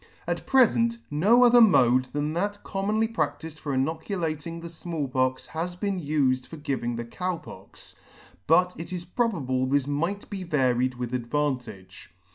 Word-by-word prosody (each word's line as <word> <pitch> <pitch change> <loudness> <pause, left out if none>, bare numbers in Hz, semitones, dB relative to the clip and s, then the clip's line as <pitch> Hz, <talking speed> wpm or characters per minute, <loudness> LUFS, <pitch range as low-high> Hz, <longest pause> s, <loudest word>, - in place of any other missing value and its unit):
At - - -3
prefent, 235 -3 +4
no 210 +12 +5
other 240 0 +7
mode 130 - +5
than 145 +3 -3
that 205 +4 -2
commonly 210 +3 0
practifed 160 -5 -3
for 145 - -4
inoculating 160 +3 -2
the 170 - -7
Small 165 -3 -4
Pox 130 0 0
has 175 +2 -4
been 195 0 -2
ufed 140 -4 +1
for 165 - -9
giving 135 -5 -2
the 120 0 -4
Cow 180 +8 -3
Pox; - - -12 0.5
but 180 +3 +4
it 165 +1 -7
is 175 -1 -5
probable 160 - 0
this 140 0 +2
might 165 +8 -2
be 195 -3 -5
varied 130 -6 +1
with 125 0 -5
advantage. 125 -7 -3
160 Hz, 155 wpm, -26 LUFS, 130-185 Hz, 0.5 s, other